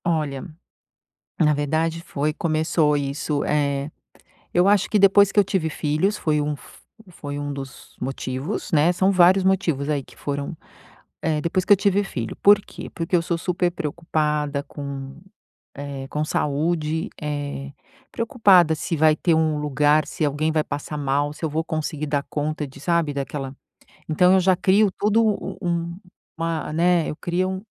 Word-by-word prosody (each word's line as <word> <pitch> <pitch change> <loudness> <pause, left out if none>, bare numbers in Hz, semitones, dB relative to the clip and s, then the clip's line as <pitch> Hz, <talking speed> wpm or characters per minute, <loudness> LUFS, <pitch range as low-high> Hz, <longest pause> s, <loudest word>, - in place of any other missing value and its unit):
Olha, 150 -5 -1 1.0
na 150 -2 +4
verdade 160 +3 -1
foi 150 -1 -2
começou 155 -2 +1
isso, 145 +1 -2
eh, 140 -1 0 0.6
eu 175 +2 +4
acho 205 0 +4
que 210 - +2
depois 200 0 +6
que - - +3
eu - - +6
tive 190 -4 -1
filhos 155 +9 0
foi 150 -2 0
um 150 0 -1
f 145 - -13 0.3
foi 145 -3 -6
um 145 0 -4
dos 135 -2 -9
motivos, 135 +9 -4
né, 160 +1 +4
são 190 +2 +2
vários 185 +1 +5
motivos 175 -7 +1
aí 145 -2 0
que - - -18
foram, 145 +3 -4 0.7
eh, 155 -2 0
depois 170 +4 0
que 205 - -3
eu - - +4
tive 200 +1 +2
filho, 120 - -5
por 205 0 +7
quê? - - -9
Porque 165 +1 -2
eu 170 - +3
sou 170 0 -2
super 180 +1 0
preocupada 150 -3 -2
com, 140 -2 -7 0.6
eh, 140 -1 -6
com 150 +1 -2
saúde, 155 +2 -1
eh, 145 -2 -4 0.4
preocupada 205 - +4
se 165 +2 -3
vai 155 0 +5
ter 165 +1 +2
um 160 -1 +1
lugar, 150 +1 +2
se 155 - -2
alguém 150 +2 0
vai 155 -1 +1
passar 150 +1 -5
mal, 145 +1 0
se 160 - -5
eu - - -1
vou 160 +2 -1
conseguir 155 -1 -3
dar 145 -1 0
conta 150 0 -2
de 135 - -14
sabe, 165 -1 0
daquela 135 0 -4 0.5
então 180 +4 +4
eu - - +5
já 185 +1 +4
crio 195 +3 +4
todo 215 +2 +3 0.4
um 170 -1 -2 0.4
uma, 165 -2 -2
né, 170 +1 +2
eu 150 - -6
crio 185 +3 -2
155 Hz, 165 wpm, -23 LUFS, 145-175 Hz, 1.0 s, por